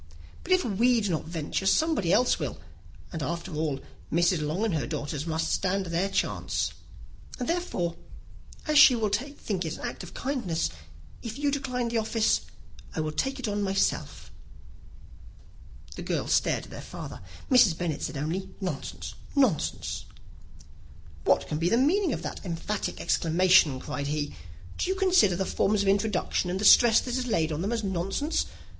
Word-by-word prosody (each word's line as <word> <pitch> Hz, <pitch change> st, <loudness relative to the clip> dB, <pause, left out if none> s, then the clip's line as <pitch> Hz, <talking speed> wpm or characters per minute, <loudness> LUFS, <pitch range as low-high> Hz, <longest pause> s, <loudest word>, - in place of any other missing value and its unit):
But 370 Hz, -, -7 dB
if 370 Hz, -1 st, +4 dB
we 235 Hz, +3 st, +3 dB
do 205 Hz, -4 st, -1 dB
not 160 Hz, -, -2 dB
venture, 165 Hz, +3 st, -3 dB
somebody 305 Hz, -, +2 dB
else 250 Hz, +6 st, +3 dB
will; -, -, -3 dB, 0.6 s
and 160 Hz, -, -4 dB
after 170 Hz, +5 st, -4 dB
all, 150 Hz, -3 st, -1 dB, 0.3 s
Mrs. 170 Hz, 0 st, +2 dB
Long 155 Hz, +8 st, -1 dB
and 215 Hz, -, 0 dB
her 145 Hz, -7 st, -1 dB
nieces 145 Hz, +2 st, -4 dB
must 160 Hz, 0 st, -1 dB
stand 195 Hz, 0 st, 0 dB
their 175 Hz, +3 st, 0 dB
chance; -, -, -1 dB, 0.6 s
and, 245 Hz, -, -3 dB
therefore, 260 Hz, -, -1 dB, 0.7 s
as 305 Hz, -2 st, +4 dB
she 280 Hz, -4 st, +9 dB
will 220 Hz, -3 st, 0 dB
think 215 Hz, -5 st, -3 dB
it 160 Hz, -1 st, -4 dB
an -, -, -6 dB
act -, -, -6 dB
of 180 Hz, -, -10 dB
kindness, 230 Hz, -, -1 dB, 0.5 s
if 230 Hz, +1 st, -6 dB
you 285 Hz, 0 st, +1 dB
decline 250 Hz, -4 st, -2 dB
the 230 Hz, -1 st, +1 dB
office, 220 Hz, 0 st, +1 dB, 0.5 s
I -, -, -2 dB
will 155 Hz, 0 st, -2 dB
take 270 Hz, -, -1 dB
it 255 Hz, -, -3 dB
on 205 Hz, 0 st, -1 dB
myself." 195 Hz, -1 st, -1 dB, 1.6 s
The -, -, -7 dB
girls -, -, -1 dB
stared -, -, +2 dB
at -, -, -13 dB
their -, -, -7 dB
father. -, -, -8 dB, 0.3 s
Mrs. 225 Hz, -10 st, +6 dB
Bennet 160 Hz, -4 st, -2 dB
said 155 Hz, -, -3 dB
only, 160 Hz, +7 st, -3 dB
"Nonsense, 190 Hz, -3 st, -5 dB, 0.2 s
nonsense!" 260 Hz, -, 0 dB, 1.2 s
"What -, -, +3 dB
can 150 Hz, -, -2 dB
be 170 Hz, +2 st, +2 dB
the 230 Hz, -, +3 dB
meaning 330 Hz, +7 st, +3 dB
of -, -, -3 dB
that -, -, -6 dB
emphatic 190 Hz, +3 st, -3 dB
exclamation?" 165 Hz, -4 st, +3 dB
cried 140 Hz, +2 st, -4 dB
he. 145 Hz, 0 st, -2 dB, 0.5 s
"Do -, -, 0 dB
you 380 Hz, -, +1 dB
consider 365 Hz, -, +4 dB
the 190 Hz, +2 st, -1 dB
forms 200 Hz, +2 st, +1 dB
of -, -, -2 dB
introduction, 195 Hz, -2 st, +1 dB
and 185 Hz, +2 st, -2 dB
the 210 Hz, -, -1 dB
stress 230 Hz, +1 st, +8 dB
that 250 Hz, -1 st, -3 dB
is 255 Hz, -1 st, -1 dB
laid 165 Hz, -8 st, +1 dB
on 155 Hz, +1 st, -2 dB
them, 200 Hz, +5 st, -1 dB
as 230 Hz, -2 st, -1 dB
nonsense? 195 Hz, -, -1 dB
195 Hz, 175 wpm, -27 LUFS, 165-245 Hz, 1.6 s, she